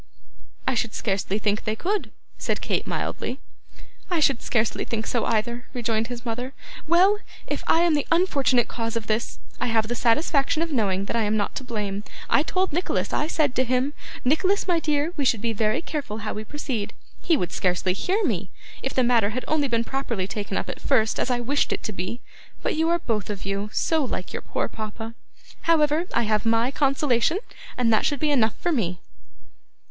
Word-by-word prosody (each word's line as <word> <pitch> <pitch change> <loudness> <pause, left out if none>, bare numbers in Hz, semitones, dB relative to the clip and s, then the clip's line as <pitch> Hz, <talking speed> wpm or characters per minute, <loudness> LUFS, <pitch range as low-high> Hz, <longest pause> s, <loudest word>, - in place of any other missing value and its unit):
'I 265 - +2
should 235 -2 -1
scarcely 195 -1 -1
think 210 0 0
they 215 - -1
could,' 395 - -1 0.3
said - - -1
Kate - - -1
mildly. 255 - -3 0.7
'I 350 -3 +1
should 275 -5 +3
scarcely 225 -2 0
think 220 -1 -3
so, 240 - 0
either,' 235 +3 -1
rejoined 225 -2 0
her 245 0 -5
mother. 245 +3 -3 0.3
'Well! 375 +5 +5 0.3
if - - -3
I 330 - +5
am 345 -2 +4
the 290 -2 +1
unfortunate 275 -9 +3
cause 230 -1 -3
of 230 -2 -2
this, 220 +2 -1 0.2
I - - 0
have 225 -2 +2
the 240 - -1
satisfaction 280 +6 +2
of 335 - -4
knowing 200 -7 +1
that - - -2
I 230 - +2
am 215 0 +1
not 205 - -1
to - - -4
blame. 210 -5 -3 0.3
I - - +6
told 370 +2 0
Nicholas, 355 +4 0
I 300 - +1
said 305 -5 +1
to 260 - +2
him, 255 +3 +1 0.3
"Nicholas, 370 +10 +2
my 350 -2 +3
dear, 300 +1 0
we 290 - +1
should 240 -4 +3
be 230 +1 -1
very 215 +7 +1
careful 225 -11 -4
how - - -2
we 215 +1 -5
proceed." 255 -6 -3 0.3
He 330 - +3
would 175 -7 -2
scarcely 180 0 +1
hear 380 - 0
me. 195 - -1 0.3
If 265 - -3
the 255 - +4
matter 235 -4 +4
had 250 +4 -4
only 305 -2 +2
been 230 -2 +1
properly 235 -7 -2
taken 200 -1 -3
up - - -2
at - - -6
first, 225 -6 +2
as - - 0
I 245 -1 +1
wished 280 +4 +1
it - - -2
to 215 - -3
be! 185 +7 -4 0.4
But - - 0
you 320 +1 +2
are 340 - +4
both 225 - -2
of 200 -2 -4
you 200 +1 -2
so 320 +5 +2
like 210 -7 -4
your - - -3
poor - - -2
papa. 220 +1 -6 0.6
However, 310 0 +4
I 235 - +2
have 215 -1 +1
MY 230 +2 +2
consolation, 275 +2 +2 0.4
and 235 -2 +3
that 215 - +3
should 290 -3 -1
be 305 -1 +2
enough 230 -6 +3
for 350 - 0
me! 185 - 0
240 Hz, 205 wpm, -25 LUFS, 215-295 Hz, 0.7 s, I